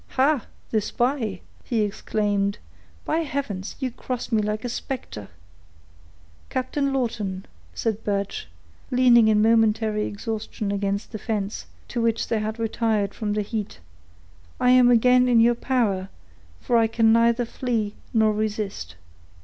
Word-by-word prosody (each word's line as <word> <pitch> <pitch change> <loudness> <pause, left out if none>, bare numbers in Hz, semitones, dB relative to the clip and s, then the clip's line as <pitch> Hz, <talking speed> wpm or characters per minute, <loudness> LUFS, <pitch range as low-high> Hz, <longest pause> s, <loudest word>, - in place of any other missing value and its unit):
"Ha! 270 -2 +3 0.2
the 220 - +2
spy," 235 -3 -1 0.2
he 230 -3 0
exclaimed; 205 -1 -1 0.5
"by - - 0
heavens, 265 - -3
you 260 -3 -2
cross 250 +1 -5
me 220 -2 +3
like 210 +2 -2
a - - 0
specter." 235 - -5 1.2
"Captain 275 +2 -1
Lawton," 215 -8 -2 0.3
said 220 -1 -2
Birch, 200 -1 -2 0.4
leaning 245 -3 +5
in 210 -1 +4
momentary 220 -1 +2
exhaustion 210 -1 -4
against 200 +1 -2
the 215 - -5
fence, 210 -1 -3 0.2
to 240 - -2
which 230 -1 0
they 225 - +1
had 215 +1 -3
retired 220 -3 0
from 210 -2 -2
the 210 0 0
heat, 210 - -5 0.8
"I 250 - +4
am 250 -1 +6
again 250 +1 +5
in 240 -2 +5
your 235 +1 +5
power, 220 -7 0 0.5
for 240 - +1
I 225 -1 +4
can 225 0 +3
neither 235 +1 +3
flee, 225 -4 -2 0.2
nor 220 -2 +3
resist." 210 - -3
225 Hz, 140 wpm, -24 LUFS, 210-245 Hz, 1.2 s, am